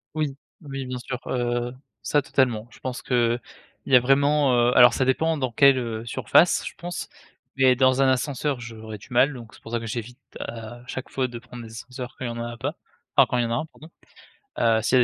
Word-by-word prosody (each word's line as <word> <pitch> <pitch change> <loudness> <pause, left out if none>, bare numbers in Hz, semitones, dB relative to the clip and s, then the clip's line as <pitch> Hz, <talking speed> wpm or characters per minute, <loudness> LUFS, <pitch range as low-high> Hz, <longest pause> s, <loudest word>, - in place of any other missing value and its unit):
Oui, 150 -3 -1 0.3
oui, 135 -3 -6
bien 125 0 -5
sûr, 125 +1 -5
heu, 120 -1 -1 0.3
ça, 145 - +2
totalement. 120 -5 0
Je - - -17
pense 130 -1 -5
qu'il 120 -1 +1 0.5
y 135 - +5
a - - +9
vraiment, 140 +1 +3
heu, 120 +1 +3
alors, 120 -1 +8
ça 130 - +1
dépend 160 +5 +1
dans 130 -3 -2
quelle, 135 +2 +5
heu, 115 -2 -4
surface, 170 +8 +3
je - - -6
pense, 175 0 -5 0.5
mais 130 -1 +5
dans 130 +1 +4
un - - +4
ascenseur, 135 +1 0
j'aurais 110 -3 -8
du - - -15
mal, 130 +4 +3
donc 120 -3 -11
c'est - - -19
pour 115 - -10
ça 120 - 0
que 115 - -7
j'évite 120 +2 -5 0.2
à 115 +1 -7
chaque 130 +1 -6
fois 130 -1 -1
de 120 -1 -8
prendre 120 0 -10
les 110 - -11
ascenseurs 125 +2 -8
quand 130 - -4
il - - -1
y - - -3
en 115 - -7
a 120 - -5
a 120 - -9
pas, - - -3 0.4
enfin, - - +8
quand 125 - -1
il - - +2
y - - 0
en 115 - -3
a - - +1
un, 140 - -1
pardon. 160 0 -16 0.7
Heu 115 -1 +3
s'il 125 +3 +3
y - - +6
a - - +6
125 Hz, 245 wpm, -24 LUFS, 120-135 Hz, 0.7 s, a